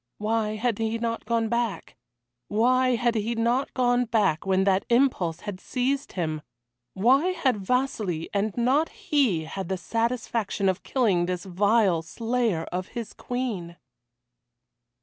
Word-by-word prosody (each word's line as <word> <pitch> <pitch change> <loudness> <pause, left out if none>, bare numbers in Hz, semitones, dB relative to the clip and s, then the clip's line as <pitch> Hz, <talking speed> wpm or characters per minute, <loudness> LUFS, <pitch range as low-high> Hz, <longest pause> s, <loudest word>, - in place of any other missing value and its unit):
Why 215 0 0
had 230 0 -1
he 225 0 0
not 230 0 -3
gone 230 0 +1
back? 235 -1 -2 0.5
Why 255 +4 +3
had 240 0 +1
he 225 +1 -1
not 235 +4 +1
gone 245 -1 +2
back 210 -7 +1
when 190 0 +3
that 190 0 +2
impulse 235 -10 +2
had 205 -3 -6
seized 270 +5 -2
him? 155 -4 -2 0.5
Why 260 - +4
had 275 -10 +1
Vasili, 205 -6 -1
and 205 +1 -1
not 265 +7 +2
he, 285 - +1
had 170 +3 -6
the 190 - -1
satisfaction 225 -1 -1
of 185 +1 -1
killing 200 -10 +1
this 180 0 -3
vile 195 -1 +2
slayer 225 0 -1
of 180 +1 -3
his 230 -2 -5
Queen? 215 -9 -4
225 Hz, 140 wpm, -26 LUFS, 190-245 Hz, 0.5 s, Why